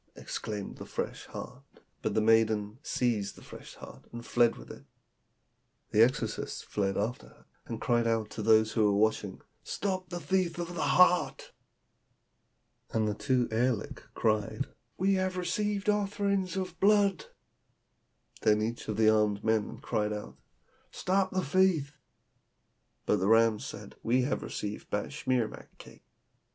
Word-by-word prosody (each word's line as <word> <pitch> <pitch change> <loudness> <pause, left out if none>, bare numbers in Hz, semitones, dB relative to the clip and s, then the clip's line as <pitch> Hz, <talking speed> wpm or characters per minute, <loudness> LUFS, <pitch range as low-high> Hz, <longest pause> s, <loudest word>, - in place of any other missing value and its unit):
exclaimed 105 -2 -5
the - - -7
fresh - - -4
heart; - - -8 0.4
but - - -1
the 110 - +3
maiden 110 0 +2
seized 115 -9 -1
the - - -14
fresh - - -11
heart - - -12
and 120 0 -8
fled 120 -1 +3
with - - -11
it. - - -12 1.1
The 105 - +4
exorcists 125 +3 +1
fled 100 -2 -1
after 110 +4 -2
her, - - -21 0.2
and - - -5
cried 120 -1 +1
out 110 -2 0
to 110 - -5
those 110 0 +4
who 110 - +2
were 100 -1 +3
watching, 105 -2 0 0.2
'Stop 185 -3 -3
the 175 0 -4
thief 175 +1 0
of 175 0 -4
the 170 - -3
heart!' 180 +1 +3 1.4
And 110 -1 0
the 105 - 0
two 125 +3 +1
aerliks 120 0 0
(fiends) - - -22
cried, 110 -2 0 0.3
'We 195 +2 +2
have 185 -1 0
received 200 +3 -1
offerings 200 -2 0
of 185 -3 -4
blood!' 200 -1 +3 1.2
Then 105 0 +4
each 115 +2 -3
of 110 - -3
the 110 -1 +4
armed 105 -1 +3
men 110 -2 0
cried 105 0 -1
out, 105 0 -6 0.5
'Stop 190 +1 0
the 185 0 -1
thief!' 155 -3 +2 1.1
But - - +3
the 95 - 0
rams 115 0 +4
said, - - -9
'We 125 +3 +2
have 135 - -1
received 105 0 -5
batschimak 125 +1 -2
cakes.' - - -14
120 Hz, 150 wpm, -30 LUFS, 110-180 Hz, 1.4 s, The